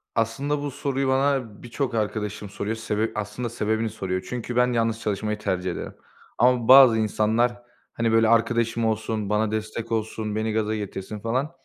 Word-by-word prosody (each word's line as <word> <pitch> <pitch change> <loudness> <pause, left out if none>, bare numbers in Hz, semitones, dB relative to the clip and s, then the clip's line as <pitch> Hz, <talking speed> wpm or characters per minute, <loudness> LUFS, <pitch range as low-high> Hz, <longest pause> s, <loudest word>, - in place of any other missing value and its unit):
Aslında, 135 +6 0
bu 145 -1 -3
soruyu 135 0 -2
bana 130 -5 0
birçok 120 0 -3
arkadaşım 105 -1 -3
soruyor, 100 +3 -3
sebep 110 0 -2
aslında 115 +3 -3
sebebini 110 0 -1
soruyor. 95 -2 -4
Çünkü 125 0 -4
ben 125 0 +3
yalnız 115 -1 0
çalışmayı 105 0 -2
tercih 90 -2 -2
ederim. - - -6 0.4
Ama 125 -1 +3
bazı 130 -3 +9
insanlar, 110 +3 +1 0.3
hani, 115 -1 0
böyle, 115 0 +4
arkadaşım 115 0 +2
olsun, 110 -1 -1
bana 105 0 +1
destek 110 +1 -4
olsun, 110 -1 -2
beni 110 0 -1
gaza 110 0 0
getirsin 105 0 -5
falan, 130 +8 -1
110 Hz, 160 wpm, -24 LUFS, 105-120 Hz, 0.4 s, bazı